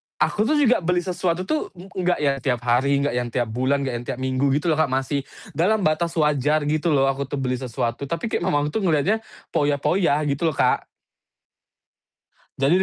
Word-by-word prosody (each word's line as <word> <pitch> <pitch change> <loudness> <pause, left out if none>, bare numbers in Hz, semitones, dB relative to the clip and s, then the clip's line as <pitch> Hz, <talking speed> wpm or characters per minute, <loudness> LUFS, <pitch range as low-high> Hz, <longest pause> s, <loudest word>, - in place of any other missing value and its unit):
aku 215 +1 +1
tuh 305 - +2
juga 260 -5 +4
beli 175 0 0
sesuatu 180 -1 -1
tuh 310 +10 -1
e 180 +2 -11
enggak 180 -3 0
yang 140 -1 +2
tiap 125 -3 -1
hari, 140 +4 +2
enggak 145 -4 -1
yang 120 - -2
tiap 120 -2 -2
bulan, 135 +4 0
enggak 130 -2 -2
yang 120 - -9
tiap 130 - -4
minggu 130 +1 +1
gitu 165 +2 0
loh 155 - 0
Kak, 160 - +3
masih 135 +2 -1 0.3
dalam 195 +4 +1
batas 160 +2 0
wajar 150 -1 +2
gitu 155 +3 0
loh 135 - +3
aku 135 0 -4
tuh 145 - -4
beli 130 -1 -1
sesuatu, 120 0 -3
tapi 170 +9 -3
kayak - - 0
mamahku 145 0 +1
tuh 220 - -1
ngeliatnya 175 +6 +2 0.3
foya-foya 145 +2 +1
gitu 145 +3 0
loh 155 - -1
Kak. - - +2 1.8
Jadi 140 +6 +4
145 Hz, 195 wpm, -23 LUFS, 135-175 Hz, 1.8 s, juga